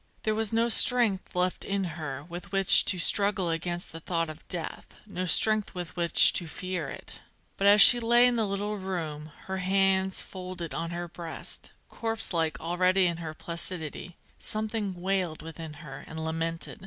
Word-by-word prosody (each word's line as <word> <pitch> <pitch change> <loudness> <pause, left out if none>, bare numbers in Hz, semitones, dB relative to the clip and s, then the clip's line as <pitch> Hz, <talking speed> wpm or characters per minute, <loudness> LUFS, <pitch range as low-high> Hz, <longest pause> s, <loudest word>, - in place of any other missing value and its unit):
There 215 - 0
was 220 -1 -2
no 230 +1 +1
strength 230 -5 +2
left 180 0 -1
in 200 0 -2
her 155 -6 -6
with 175 +2 -10
which 195 -1 +7
to 185 - +2
struggle 190 0 +4
against 175 +2 -3
the 165 - -8
thought 165 -1 -3
of 155 - -15
death, 175 -3 -6 0.2
no 185 -3 -5
strength 215 +4 +2
with 175 -2 -7
which 170 -1 +5
to 175 - -2
fear 180 -3 -5
it. - - -10 0.4
But, 200 - 0
as 205 0 +8
she 245 - +8
lay 240 +1 +4
in 245 -1 +2
the 225 -3 -1
little 205 +2 -3
room, 160 -6 -6
her 190 0 -4
hands 190 0 +1
folded 180 -3 -7
on 165 - -4
her 175 0 -5
breast, 170 -1 -9 0.2
corpse 225 -3 -4
like 160 -5 -1
already 180 +3 +1
in 170 -2 -1
her 160 -2 -7
placidity, 170 0 -4 0.2
something 215 -3 -2
wailed 180 -4 -2
within 160 -1 -9
her 135 -1 -10
and 160 0 -6
lamented. 165 +4 -3
180 Hz, 175 wpm, -27 LUFS, 165-200 Hz, 0.4 s, as